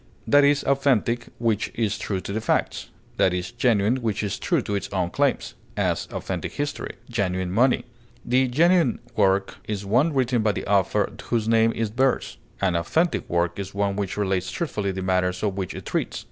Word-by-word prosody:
That 145 Hz, 0 st, +5 dB
is 140 Hz, 0 st, +3 dB
authentic 130 Hz, -4 st, +1 dB
which 115 Hz, -3 st, 0 dB
is 110 Hz, -3 st, -1 dB
true 95 Hz, -3 st, -2 dB
to 100 Hz, -, -5 dB
the 110 Hz, -, -1 dB
facts; 115 Hz, -, -1 dB, 0.3 s
that 90 Hz, -, +3 dB
is 90 Hz, 0 st, -3 dB
genuine 120 Hz, -1 st, +2 dB
which 110 Hz, -4 st, -2 dB
is 100 Hz, -, -3 dB
true -, -, +1 dB
to 105 Hz, -, -3 dB
its 100 Hz, -1 st, -2 dB
own 90 Hz, -3 st, -1 dB
claims; -, -, 0 dB, 0.2 s
as, -, -, 0 dB
authentic -, -, -4 dB
history; 145 Hz, 0 st, -4 dB
genuine 95 Hz, -6 st, -1 dB
money. 125 Hz, +6 st, +3 dB, 0.5 s
A 130 Hz, +1 st, +4 dB
'genuine' 165 Hz, +1 st, +3 dB, 0.2 s
work 95 Hz, -1 st, +2 dB
is 105 Hz, -2 st, -3 dB
one 125 Hz, +11 st, +3 dB
written 130 Hz, -4 st, +1 dB
by 105 Hz, -1 st, +2 dB
the -, -, -4 dB
author 100 Hz, -2 st, +2 dB
whose 115 Hz, -2 st, 0 dB
name 115 Hz, 0 st, +4 dB
it 110 Hz, -1 st, -2 dB
bears; 130 Hz, +1 st, +1 dB, 0.2 s
an 95 Hz, -3 st, +1 dB
'authentic' 160 Hz, -, 0 dB
work 85 Hz, +1 st, 0 dB
is 95 Hz, 0 st, -6 dB
one 100 Hz, -1 st, 0 dB
which 100 Hz, -1 st, -3 dB
relates 95 Hz, -2 st, 0 dB
truthfully 105 Hz, -, -2 dB
the 95 Hz, 0 st, -4 dB
matters 90 Hz, 0 st, 0 dB
of 100 Hz, -3 st, 0 dB
which 95 Hz, -2 st, -4 dB
it -, -, -8 dB
treats. -, -, -2 dB
105 Hz, 190 wpm, -24 LUFS, 95-125 Hz, 0.5 s, That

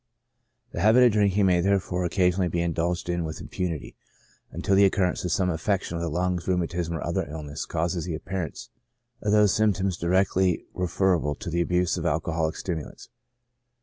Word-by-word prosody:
The -, -, -5 dB
habit 110 Hz, +5 st, +6 dB
of 120 Hz, -, +6 dB
drinking 100 Hz, -1 st, +2 dB
may 90 Hz, -2 st, +3 dB
therefore 95 Hz, -1 st, 0 dB
occasionally 90 Hz, 0 st, +2 dB
be 85 Hz, 0 st, -1 dB
indulged 85 Hz, +1 st, -1 dB
in 85 Hz, -1 st, -1 dB
with 80 Hz, -1 st, -5 dB
impunity, 85 Hz, -6 st, -4 dB, 0.5 s
until 100 Hz, -, -2 dB
the 100 Hz, -, +6 dB
occurence 95 Hz, -2 st, +2 dB
of 90 Hz, -, -2 dB
some 90 Hz, +2 st, +1 dB
affection 90 Hz, +2 st, -1 dB
of 85 Hz, -, -3 dB
the 85 Hz, -, -2 dB
lungs, 90 Hz, +2 st, -1 dB
or 95 Hz, -, +3 dB
rheumatism, 85 Hz, -1 st, -2 dB
or 80 Hz, -, -4 dB
another -, -, -2 dB
illness, 75 Hz, -1 st, -6 dB
causes 85 Hz, 0 st, -2 dB
the 85 Hz, -, -3 dB
appear 90 Hz, +4 st, -4 dB
ance 80 Hz, -, -10 dB, 0.5 s
of 105 Hz, -, 0 dB
those 105 Hz, -2 st, +5 dB
symptoms 95 Hz, -4 st, +1 dB
directly 90 Hz, 0 st, +1 dB
referable 90 Hz, -4 st, 0 dB
to 100 Hz, -6 st, -7 dB
the 85 Hz, +1 st, +1 dB
abuse 90 Hz, 0 st, +1 dB
of -, -, -1 dB
alcoholic 80 Hz, 0 st, -1 dB
stimulants. 80 Hz, -5 st, -6 dB
90 Hz, 180 wpm, -26 LUFS, 85-95 Hz, 0.5 s, habit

